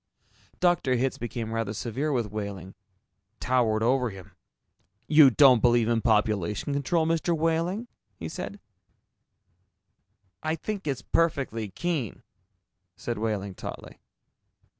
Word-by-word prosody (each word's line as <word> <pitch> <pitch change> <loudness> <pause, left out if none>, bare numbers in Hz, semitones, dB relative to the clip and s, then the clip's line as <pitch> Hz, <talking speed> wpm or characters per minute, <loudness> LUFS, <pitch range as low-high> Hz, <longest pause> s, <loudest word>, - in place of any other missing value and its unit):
Dr. 175 -8 +2
Hitz 130 +1 -1
became 115 -1 -4
rather 115 -2 -2
severe 130 +8 -2
with 120 -6 -1
Wehling, 100 -3 -5 0.7
towered 115 -4 +1
over 125 +1 +2
him. 95 -2 -11 0.8
"You 150 -3 +8
don't 130 -2 +6
believe 120 -2 +4
in 115 -1 +1
population 105 +1 +1
control, 160 +4 +1
Mr. 165 +1 +1
Wehling?" 165 +7 0 0.3
he 85 -3 -6
said. - - -6 1.8
"I 160 +1 -1
think 195 +2 -5
it's 135 -4 -2
perfectly 135 -10 0
keen," 145 - -3 0.7
said 120 -3 -4
Wehling 105 -3 -2
tautly. - - -8
120 Hz, 115 wpm, -27 LUFS, 110-155 Hz, 1.8 s, You